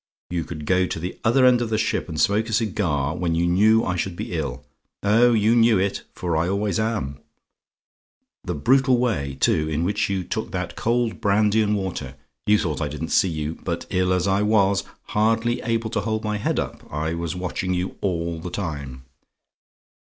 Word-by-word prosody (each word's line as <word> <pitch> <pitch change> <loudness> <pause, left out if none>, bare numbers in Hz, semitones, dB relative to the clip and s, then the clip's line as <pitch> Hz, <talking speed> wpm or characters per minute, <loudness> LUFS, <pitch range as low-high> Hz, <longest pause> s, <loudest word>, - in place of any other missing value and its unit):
You 85 -2 -1
could 75 -2 -7
go 95 +2 +2
to - - -4
the 90 +3 -5
other 130 +3 +4
end 125 -1 +5
of 120 - -1
the 110 - +1
ship 105 - -1
and 80 -2 -4
smoke 105 +8 +2
a - - -3
cigar, 85 - 0
when 85 -2 -1
you 85 +1 +1
knew 105 +6 +4
I 90 - -1
should 90 0 -2
be - - -5
ill 70 -3 -3 0.4
oh, 115 +4 +5
you 110 +1 +3
knew 115 -2 +5
it; 95 +1 -1
for 85 -2 -2
I 85 +3 +1
always 100 -1 0
am. 110 -12 -2 1.2
The 90 - -3
brutal 130 - +3
way, 70 - -1
too, 75 0 +2
in 80 +1 -1
which 100 +4 0
you 95 -2 -1
took - - -4
that - - -3
cold 120 0 0
brandy 105 +1 +3
and 105 0 +1
water 85 -9 -4 0.3
you 105 0 +5
thought 80 -7 -2
I 75 - 0
didn't 75 +3 -5
see 95 - +3
you; 80 -1 -4
but - - -3
ill 90 0 +1
as 90 +1 +1
I 95 +1 +2
was, 100 -2 +3 0.3
hardly 115 +2 +1
able 115 -2 -1
to - - 0
hold 110 +1 -2
my 105 -1 -1
head 105 - -1
up, - - -5
I 80 +2 -2
was 85 +1 -3
watching 90 0 -2
you 90 +1 -3
all 85 -3 -1
the 90 - -6
time. 70 -9 -5
95 Hz, 200 wpm, -23 LUFS, 80-110 Hz, 1.2 s, end